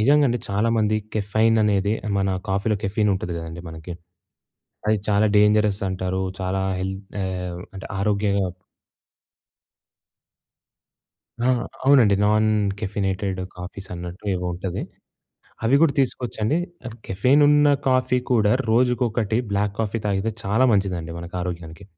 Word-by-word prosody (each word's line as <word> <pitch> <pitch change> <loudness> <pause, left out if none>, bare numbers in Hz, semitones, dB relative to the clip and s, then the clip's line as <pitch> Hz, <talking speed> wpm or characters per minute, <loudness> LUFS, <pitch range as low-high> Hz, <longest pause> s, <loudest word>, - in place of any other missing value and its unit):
నిజంగా 145 +6 +5
అండి, 120 - 0
చాలా 105 +3 +1
మంది 110 0 +2 0.2
కెఫైన్ 110 +2 +2
అనేదే, 100 0 +2 0.2
మన 95 0 +1 0.2
కాఫీలో 100 +3 +1
కెఫీన్ 105 +1 +1
ఉంటది 90 -2 -4
కదండీ! 80 +1 -7
మనకి. 80 +2 -8 0.9
అది 110 0 +3
చాలా 105 +1 +3
డేంజరస్ 105 -1 +3
అంటారు. 95 0 -2 0.2
చాలా 95 +1 -1 0.2
హెల్త్ 95 +1 -3 0.2
ఆహ్, 90 -1 -4
అంటే 95 - -7
ఆరోగ్యంగా 100 0 +1 3.0
ఆ! - - +2 0.4
అవునండి. 125 -8 +5
నాన్ 110 +1 +3 0.3
కెఫినేటెడ్ 95 -2 -2 0.2
కాఫీస్ 95 +2 -8
అన్నట్టు 90 +2 -8
ఏవో 90 0 -3
ఉంటది. 90 0 -4 0.8
అవి 125 +5 +4
కూడా 160 -4 +5
తీసుకోవచ్చండి. 125 0 -1 0.5
కెఫెన్ 125 +10 +3
ఉన్న 150 0 +5 0.2
కాఫీ 130 0 +2
కూడా, 110 -4 +4 0.2
రోజుకొకటి 120 -2 +1
బ్లాక్ 100 0 0
కాఫీ 110 +1 -1
తాగితే, 100 +2 0
చాలా 110 +7 +3
మంచిదండి 90 -4 -1
మనకు 85 +1 -7
ఆరోగ్యానికి. 85 0 -6
100 Hz, 120 wpm, -23 LUFS, 95-110 Hz, 3.0 s, నిజంగా